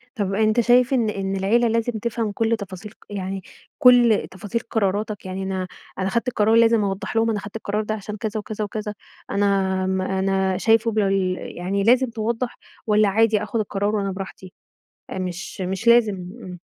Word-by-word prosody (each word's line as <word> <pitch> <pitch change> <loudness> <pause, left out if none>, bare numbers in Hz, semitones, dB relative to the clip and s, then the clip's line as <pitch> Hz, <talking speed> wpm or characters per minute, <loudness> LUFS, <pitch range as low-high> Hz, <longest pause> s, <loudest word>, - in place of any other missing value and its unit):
طب 200 -4 -1
أنتَ 215 +3 +2
شايف 245 +2 +4
إن 230 -4 +2
إن 195 -1 -2
العيلة 225 +5 +2
لازم 230 +1 0
تفهم 230 -1 -2
كُل 225 +2 0
تفاصيل 200 0 -8
ق - - -24
يعني 195 -1 -4 0.4
كل 245 -4 +6
تفاصيل 205 +4 -4
قراراتَك، 210 -2 -2
يعني 190 +1 -4
أنا 190 -1 -3 0.3
أنا 190 +1 0
خدت 235 +5 0
قرار، 220 -1 +2
لازم 230 -2 +5
أوضَّح 195 +1 -3
لهم 225 0 +3
أنا 215 - 0
خدت 200 +2 -10
القرار 215 -1 -2
ده 215 - -2
عشان 210 0 -7
كذا 215 +1 -3
وكذا 215 0 -4
وكذا، 210 0 -4 0.4
أنا 200 0 +1 0.4
آمم 190 0 0
أنا 190 0 0
شايفُه 225 +4 +3
بال 195 -3 +1 0.2
يعني 195 +3 -1
لازم 250 +3 +4
توضَّح 230 +2 -3 0.3
والّا 210 -1 +4
عادي 215 0 +3
آخد 225 +1 -2
القرار 205 0 -1
وأنا 195 -1 -1
براحتي؟ 190 -1 -8 0.6
آآ - - -4
مش 180 +1 -5
مش 190 +5 -3
لازم 235 -3 +5
امم 180 0 -9
210 Hz, 180 wpm, -22 LUFS, 195-225 Hz, 0.6 s, كل